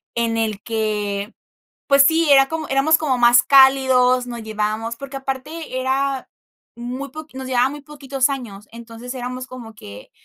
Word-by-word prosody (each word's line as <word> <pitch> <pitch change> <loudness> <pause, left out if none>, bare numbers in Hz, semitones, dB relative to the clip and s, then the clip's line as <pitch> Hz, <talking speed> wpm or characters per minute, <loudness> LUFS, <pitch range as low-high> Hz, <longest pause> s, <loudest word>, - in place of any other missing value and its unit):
en 230 -1 -1
el 215 -3 -2
que, 210 -2 -3 0.5
pues 275 0 +6
sí, 320 +1 +2
era 270 -1 +6
como 320 -2 -5
éramos 275 +4 +3
como 270 -5 -1
más 240 0 +6
cálidos, 260 -2 +4
nos 235 -1 -6
llevábamos 215 +2 -3
porque 275 +1 -8
aparte 270 +1 -5
era 270 0 -1 0.5
muy 255 +3 -6
poqui 310 -2 -11
nos 265 -1 -6
llevaba 255 +1 +2
muy 295 0 -8
poquitos 275 -2 -2
años. 210 -7 -7
Entonces 235 +2 -9
éramos 255 0 -6
como 235 -3 -10
que, 100 - -12
255 Hz, 160 wpm, -20 LUFS, 230-275 Hz, 0.5 s, pues